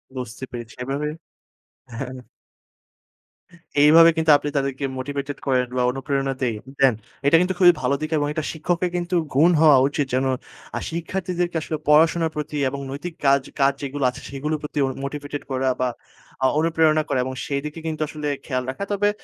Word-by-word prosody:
বুঝতে 125 Hz, -1 st, -6 dB
পেরেছি। 120 Hz, -2 st, -8 dB
এভাবে 140 Hz, +3 st, -2 dB, 0.9 s
হ্যাঁ। 130 Hz, 0 st, -5 dB, 1.6 s
এইভাবে 165 Hz, +3 st, +8 dB
কিন্তু 160 Hz, -1 st, +4 dB
আপনি 145 Hz, -, -4 dB
তাদেরকে 135 Hz, 0 st, -1 dB
মোটিভেটেড 140 Hz, +2 st, -4 dB
করেন 125 Hz, -2 st, +2 dB
বা -, -, +2 dB
অনুপ্রেরণা 135 Hz, +1 st, -1 dB
দেইন 115 Hz, -4 st, -1 dB, 0.2 s
দেন। 135 Hz, -2 st, +5 dB, 0.3 s
এটা 165 Hz, -, +7 dB
কিন্তু 185 Hz, +1 st, +1 dB
খুবই 175 Hz, -2 st, +8 dB
ভালো 135 Hz, +2 st, +1 dB
দিকে 155 Hz, +1 st, -3 dB
এবং 145 Hz, -, 0 dB, 0.3 s
শিক্ষকের 175 Hz, +3 st, -1 dB
কিন্তু 175 Hz, +1 st, -1 dB, 0.2 s
গুণ 155 Hz, +7 st, +5 dB
হওয়া 150 Hz, -4 st, +7 dB
উচিত 145 Hz, 0 st, -1 dB
যেন 130 Hz, +1 st, +2 dB, 0.6 s
শিক্ষার্থীদেরকে 175 Hz, +1 st, -2 dB
আসলে 155 Hz, 0 st, -3 dB
পড়াশোনার 160 Hz, +2 st, +4 dB
প্রতি 150 Hz, 0 st, -4 dB
এবং 140 Hz, -, -5 dB
নৈতিক 150 Hz, +5 st, -6 dB
কাজ 140 Hz, 0 st, +5 dB, 0.2 s
কাজ 140 Hz, 0 st, +4 dB
যেগুলো 140 Hz, 0 st, -3 dB
আছে -, -, -9 dB
সেগুলোর 150 Hz, +3 st, -3 dB
প্রতি 150 Hz, 0 st, -3 dB, 0.2 s
মোটিভেটেড 145 Hz, +1 st, -5 dB
করা 130 Hz, 0 st, +1 dB
বা 125 Hz, -, +2 dB, 0.6 s
আ -, -, +6 dB
অনুপ্রেরণা 160 Hz, -1 st, +3 dB
করা 130 Hz, -, +1 dB
এবং 130 Hz, -, -4 dB
সেদিকে 150 Hz, +3 st, -3 dB
কিন্তু 155 Hz, -1 st, -3 dB
আসলে 150 Hz, 0 st, -5 dB, 0.2 s
খেয়াল 130 Hz, -2 st, -1 dB
রাখা। 135 Hz, +9 st, -4 dB
তবে 205 Hz, +1 st, +2 dB
145 Hz, 160 wpm, -23 LUFS, 135-160 Hz, 1.6 s, এইভাবে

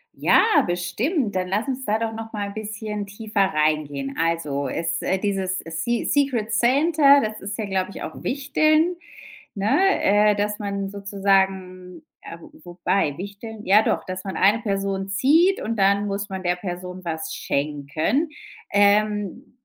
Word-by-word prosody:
Ja -, -, +4 dB, 0.2 s
bestimmt, 205 Hz, -, -1 dB
dann 185 Hz, 0 st, -1 dB
lass 205 Hz, +7 st, -1 dB
uns 265 Hz, 0 st, -3 dB
da 215 Hz, +1 st, +1 dB
doch 225 Hz, 0 st, -3 dB
noch 225 Hz, 0 st, -7 dB
mal 205 Hz, -1 st, -3 dB
bisschen 210 Hz, -1 st, -5 dB
tiefer 210 Hz, 0 st, -2 dB
reingehen. 150 Hz, -3 st, -1 dB
Also 155 Hz, -4 st, -1 dB
es, 165 Hz, +3 st, -2 dB
äh, 190 Hz, -, 0 dB
dieses 190 Hz, -1 st, -1 dB
Se 170 Hz, +9 st, -2 dB
Secret 250 Hz, -6 st, 0 dB
Santa 280 Hz, +4 st, +5 dB
das 215 Hz, -3 st, -3 dB
ist 200 Hz, +1 st, -5 dB
ja, 220 Hz, -, -2 dB
glaube 190 Hz, -1 st, -1 dB
ich, -, -, -8 dB
auch -, -, -7 dB
Wichteln, 310 Hz, +5 st, +2 dB, 0.6 s
ne? 230 Hz, -, +2 dB
Äh, 210 Hz, +1 st, +4 dB
dass 205 Hz, +1 st, -2 dB
man 200 Hz, -1 st, -3 dB
sozusagen 190 Hz, -3 st, -1 dB, 0.2 s
äh, 170 Hz, -, -9 dB
wo -, -, -14 dB
wobei, 175 Hz, -3 st, -1 dB
Wichteln? 210 Hz, +3 st, -8 dB
Ja, 205 Hz, +3 st, +6 dB
doch, -, -, -1 dB
dass 185 Hz, 0 st, -6 dB
man 190 Hz, -, -4 dB
eine 210 Hz, +4 st, +4 dB
Person 195 Hz, -2 st, -2 dB
zieht 320 Hz, -, +3 dB
und 225 Hz, +1 st, -3 dB
dann 200 Hz, +1 st, +2 dB
muss 200 Hz, 0 st, -3 dB
man 190 Hz, -1 st, -5 dB
der 180 Hz, 0 st, 0 dB
Person 180 Hz, 0 st, -7 dB
was 160 Hz, -2 st, -4 dB
schenken. 150 Hz, -, -1 dB, 0.4 s
Ähm. 210 Hz, +3 st, +2 dB
200 Hz, 155 wpm, -23 LUFS, 185-220 Hz, 0.6 s, Ja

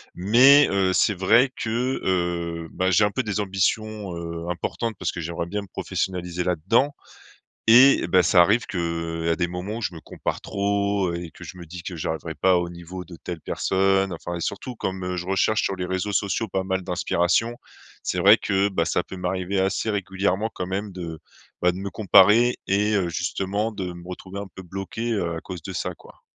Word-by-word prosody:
mais, 130 Hz, +10 st, +6 dB
heu, 95 Hz, -1 st, +2 dB
c'est 105 Hz, +2 st, +3 dB
vrai 115 Hz, +8 st, +4 dB
que, 120 Hz, +4 st, -1 dB
heu, 85 Hz, -2 st, -1 dB
bah, 95 Hz, +1 st, 0 dB
j'ai 105 Hz, -, +4 dB
un 105 Hz, -, 0 dB
peu 130 Hz, +3 st, -1 dB
des 105 Hz, -1 st, -2 dB
ambitions, 100 Hz, 0 st, -1 dB
heu, 85 Hz, 0 st, -6 dB
importantes 110 Hz, +6 st, -3 dB
parce -, -, -1 dB
que 85 Hz, -, -6 dB
j'aimerais 85 Hz, +1 st, -4 dB
bien 105 Hz, +3 st, -3 dB
me -, -, -12 dB
professionnaliser 90 Hz, -1 st, -3 dB
là-dedans, 115 Hz, -, +1 dB, 0.7 s
et, 130 Hz, +4 st, +7 dB
bah, 90 Hz, -1 st, +4 dB
ça 90 Hz, +1 st, +5 dB
arrive 105 Hz, +6 st, +3 dB
qu’à 85 Hz, -2 st, -2 dB
des 85 Hz, -, +1 dB
moments, 90 Hz, +6 st, -5 dB
je 90 Hz, -4 st, -3 dB
me 80 Hz, -, -9 dB
compare -, -, -4 dB
trop 100 Hz, -2 st, 0 dB
et 85 Hz, -2 st, -5 dB
que -, -, -12 dB
je 90 Hz, -, -10 dB
me 85 Hz, -, -9 dB
dis 85 Hz, +2 st, -9 dB
que 90 Hz, -, -6 dB
j’arriverai 80 Hz, 0 st, -4 dB
pas 95 Hz, +4 st, +3 dB
au 85 Hz, -, -3 dB
niveau 85 Hz, +1 st, -8 dB
de 90 Hz, -, -11 dB
telle 85 Hz, -2 st, -5 dB
personne. 95 Hz, 0 st, +1 dB
Enfin, 85 Hz, +1 st, -5 dB
et -, -, -6 dB
surtout 120 Hz, +8 st, -4 dB
comme, 95 Hz, -3 st, -4 dB
heu, 90 Hz, -, -2 dB
je 90 Hz, -, -4 dB
recherche 95 Hz, +3 st, +2 dB
sur 95 Hz, -, -1 dB
les 90 Hz, -, -2 dB
réseaux 95 Hz, +3 st, -2 dB
sociaux 105 Hz, +3 st, 0 dB
pas 95 Hz, 0 st, -1 dB
mal 95 Hz, 0 st, -1 dB
d'inspiration, 90 Hz, +5 st, +1 dB, 0.5 s
c'est -, -, -1 dB
vrai -, -, +8 dB
que, 100 Hz, 0 st, +1 dB
bah, 90 Hz, -4 st, 0 dB
ça 90 Hz, -, +1 dB
peut -, -, -9 dB
m'arriver 95 Hz, +1 st, -2 dB
assez 95 Hz, +3 st, 0 dB
régulièrement 100 Hz, +1 st, -1 dB
quand 90 Hz, -, -4 dB
même 100 Hz, +2 st, -3 dB
de, 85 Hz, -3 st, -7 dB, 0.4 s
bah, 90 Hz, -, +4 dB
de 90 Hz, -, -8 dB
me 100 Hz, +1 st, -4 dB
comparer 110 Hz, +4 st, +5 dB
et 105 Hz, +2 st, +2 dB
heu, 95 Hz, -3 st, +1 dB
justement, 100 Hz, +6 st, -2 dB
de 95 Hz, -4 st, -5 dB
me 85 Hz, 0 st, -11 dB
retrouver 95 Hz, +2 st, -7 dB
un 100 Hz, -, -6 dB
peu 95 Hz, -, -8 dB
bloqué, 95 Hz, +6 st, -4 dB
heu, 85 Hz, -5 st, -1 dB
à -, -, -4 dB
cause 90 Hz, -3 st, -8 dB
de 95 Hz, -, -6 dB
ça, -, -, -3 dB
quoi. -, -, -18 dB
95 Hz, 205 wpm, -24 LUFS, 85-100 Hz, 0.7 s, vrai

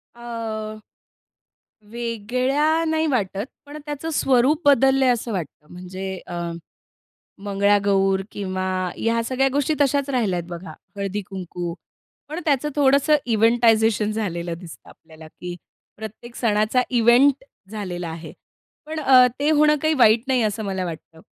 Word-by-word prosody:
अ, 225 Hz, -2 st, -5 dB, 1.1 s
वेगळ्या 255 Hz, +7 st, 0 dB
नाही 320 Hz, 0 st, 0 dB
वाटत, 210 Hz, -6 st, -1 dB, 0.2 s
पण 290 Hz, +1 st, -9 dB
त्याच 295 Hz, 0 st, -6 dB
स्वरूप 270 Hz, +4 st, +3 dB
बदललंय 270 Hz, -1 st, +4 dB
असं 235 Hz, -1 st, -1 dB
वाटतं. 160 Hz, -5 st, -6 dB
म्हणजे 185 Hz, +1 st, -6 dB
अं, 170 Hz, -1 st, -4 dB, 0.9 s
मंगळागौर 200 Hz, -1 st, +2 dB
किंवा 185 Hz, -2 st, -3 dB, 0.3 s
ह्या 230 Hz, 0 st, 0 dB
सगळ्या 265 Hz, +3 st, +1 dB
गोष्टी 285 Hz, +2 st, +1 dB
तशाच 280 Hz, 0 st, +2 dB
राहिल्यात 210 Hz, -9 st, 0 dB
बघा. 170 Hz, -1 st, -8 dB, 0.2 s
हळदी-कुंकू 190 Hz, -3 st, -5 dB, 0.5 s
पण 310 Hz, +4 st, -5 dB
त्याचं 295 Hz, -2 st, +1 dB
थोडंसं 285 Hz, +2 st, +4 dB
इव्हेंटायझेशन 225 Hz, -2 st, +3 dB
झालेलं 175 Hz, -6 st, -3 dB
दिसतं 170 Hz, -3 st, -12 dB
आपल्याला, 160 Hz, -1 st, -15 dB
की 175 Hz, +2 st, -8 dB, 0.4 s
प्रत्येक 220 Hz, +3 st, -9 dB
सणाचा 215 Hz, +2 st, +1 dB
इव्हेंट 250 Hz, +3 st, +4 dB, 0.3 s
झालेला 180 Hz, -5 st, -5 dB
आहे 160 Hz, 0 st, -8 dB, 0.5 s
पण 315 Hz, +1 st, -5 dB
अ, 260 Hz, -3 st, +7 dB
ते 295 Hz, +2 st, +2 dB
होणं 300 Hz, 0 st, +4 dB
काही 315 Hz, 0 st, +2 dB
वाईट 225 Hz, -2 st, +5 dB
नाही 255 Hz, -2 st, +2 dB
असं 215 Hz, 0 st, -1 dB
मला 190 Hz, -2 st, -2 dB
वाटतं. 165 Hz, -1 st, -8 dB
225 Hz, 125 wpm, -22 LUFS, 190-265 Hz, 1.1 s, अ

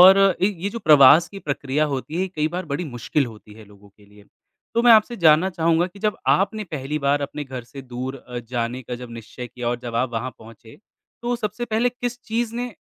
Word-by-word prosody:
और 190 Hz, +2 st, +9 dB, 0.2 s
एक 195 Hz, 0 st, +1 dB
ये 195 Hz, -, -1 dB
जो 230 Hz, -, -5 dB
प्रवास 150 Hz, -, +7 dB
की 200 Hz, -, -9 dB
प्रक्रिया 145 Hz, -2 st, -1 dB
होती 150 Hz, +6 st, -4 dB
है 190 Hz, -, +1 dB
कई 155 Hz, -4 st, -1 dB
बार 185 Hz, -, -3 dB
बड़ी 175 Hz, +5 st, -2 dB
मुश्किल 135 Hz, +1 st, -1 dB
होती 110 Hz, -2 st, -13 dB
है 110 Hz, 0 st, -13 dB
लोगों 100 Hz, 0 st, -18 dB
के 100 Hz, +1 st, -23 dB
लिए। 105 Hz, 0 st, -19 dB, 0.5 s
तो 235 Hz, -, +2 dB
मैं 240 Hz, -1 st, +8 dB
आपसे 225 Hz, +2 st, +4 dB
जानना 165 Hz, +1 st, +5 dB
चाहूँगा 170 Hz, 0 st, +2 dB
कि 185 Hz, +2 st, -14 dB
जब 210 Hz, +1 st, 0 dB
आपने 210 Hz, +2 st, +2 dB
पहली 150 Hz, -3 st, -4 dB
बार 145 Hz, +1 st, +3 dB
अपने 145 Hz, +1 st, -5 dB
घर 130 Hz, -3 st, -7 dB
से 135 Hz, +3 st, -10 dB
दूर 130 Hz, +1 st, -5 dB
अ, 125 Hz, -2 st, -8 dB
जाने 120 Hz, +1 st, -3 dB
का 125 Hz, -, -6 dB
जब 120 Hz, 0 st, -9 dB
निश्चय 115 Hz, +2 st, -8 dB
किया 120 Hz, 0 st, -5 dB
और 120 Hz, -, -1 dB
जब 120 Hz, -1 st, -6 dB
आप 120 Hz, +1 st, 0 dB
वहाँ 120 Hz, +3 st, -3 dB
पहुँचे, 110 Hz, 0 st, -15 dB, 0.4 s
तो 240 Hz, 0 st, -1 dB
सबसे 215 Hz, +2 st, -3 dB
पहले 230 Hz, +1 st, +1 dB
किस 245 Hz, 0 st, -5 dB
चीज़ 230 Hz, 0 st, -2 dB
ने 245 Hz, -1 st, -4 dB
145 Hz, 230 wpm, -22 LUFS, 120-200 Hz, 0.5 s, और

